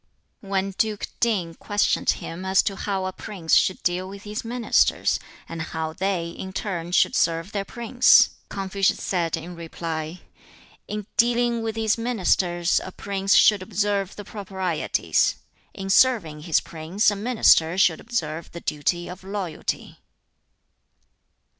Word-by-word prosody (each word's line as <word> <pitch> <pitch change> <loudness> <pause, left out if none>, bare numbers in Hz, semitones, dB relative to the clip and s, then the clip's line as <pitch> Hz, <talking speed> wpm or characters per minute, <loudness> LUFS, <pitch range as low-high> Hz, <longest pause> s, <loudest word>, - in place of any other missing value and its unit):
When 195 -1 -2
Duke 210 +1 -1
Ting 195 -8 0
questioned 205 +5 0
him 170 +3 -2
as 190 0 +3
to 195 - -2
how 195 -1 -2
a 185 - -3
prince 180 -6 -4
should 185 - +3
deal 180 +1 -1
with 200 +1 -10
his 210 +1 -5
ministers, 235 0 +2 0.3
and 165 -1 -6
how 160 0 -4
they 180 -2 -1
in 190 +2 -8
turn 175 -5 -4
should - - +3
serve 165 +3 +1
their 200 -2 -2
prince, 240 +4 +4 0.2
Confucius 195 0 0
said 170 -3 0
in 165 +2 -8
reply, 165 0 -5 0.7
"In 210 -1 -4
dealing 235 0 +2
with 225 -1 -3
his 225 0 +1
ministers 185 -6 +1
a 190 - -7
prince 195 +1 0
should 210 -3 +6
observe 200 -1 -1
the 205 - -9
proprieties; 190 -5 -1 0.4
in 195 -1 -4
serving 200 -11 +3
his 165 0 +2
prince 170 +7 0
a - - -3
minister 200 -6 +3
should 175 -4 +4
observe 165 -9 -4
the 170 - -7
duty 175 +4 -1
of 180 +1 -9
loyalty." 190 -4 -4
190 Hz, 140 wpm, -24 LUFS, 170-210 Hz, 0.7 s, should